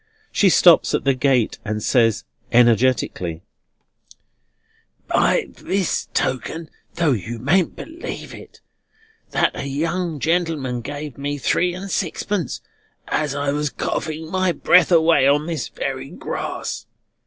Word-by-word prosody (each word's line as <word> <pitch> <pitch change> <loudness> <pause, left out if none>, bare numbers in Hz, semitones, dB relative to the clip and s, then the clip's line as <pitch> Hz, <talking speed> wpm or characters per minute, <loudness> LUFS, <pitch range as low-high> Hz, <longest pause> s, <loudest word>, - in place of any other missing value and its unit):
She 200 - +4
stops 175 -1 +5
at - - -1
the 135 - +3
gate, 130 -3 +1
and 105 -1 -3
says 115 -4 +2 0.3
energetically: 115 -8 +2 1.6
"By - - +2
this 190 -2 -2
token, 160 +5 -2 0.2
though 165 -4 +2
you 115 0 -3
mayn't 160 - +1
believe 325 +1 -7
it, - - -13 0.7
That - - +1
a - - -4
young 165 +3 -2
gentleman 160 -7 0
gave 145 +2 -7
me 145 +1 -2
three 175 +5 +1
and 195 +1 -7
sixpence 175 - -2 0.5
as 150 -2 0
I 145 0 0
was 150 0 -1
coughing 160 +5 -4
my 185 -1 +1
breath 180 0 +4
away 165 -4 +5
on 145 +2 +3
this 165 -2 -3
very - - -4
grass. - - -5
150 Hz, 125 wpm, -21 LUFS, 130-170 Hz, 1.6 s, stops